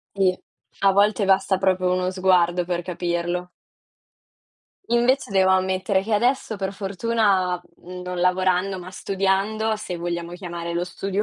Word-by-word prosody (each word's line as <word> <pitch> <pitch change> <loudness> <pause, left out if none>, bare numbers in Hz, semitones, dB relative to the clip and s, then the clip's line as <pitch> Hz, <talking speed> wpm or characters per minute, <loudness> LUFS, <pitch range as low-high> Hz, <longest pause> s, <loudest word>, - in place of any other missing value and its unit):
Sì, 185 -2 +2 0.4
a 195 -1 +4
volte 205 +1 +3
basta 190 0 +3
proprio 185 -1 +1
uno 185 0 0
sguardo 180 -2 +2
per 175 -1 -2
capirlo. 175 0 -2 1.4
Invece 240 +1 +2
devo 190 -1 +3
ammettere 190 +1 +1
che 220 +2 -4
adesso 235 0 +1
per 195 0 -3
fortuna, 195 -2 0 0.2
mhmm, 180 +1 -8
non 180 0 -5
lavorando, 185 +1 +1
ma 180 +1 -9
studiando, 195 +3 0
se 180 -4 -5
vogliamo 170 0 -4
chiamare 170 -2 -5
lo 175 - 0
studio 195 +3 -3
185 Hz, 140 wpm, -23 LUFS, 180-195 Hz, 1.4 s, a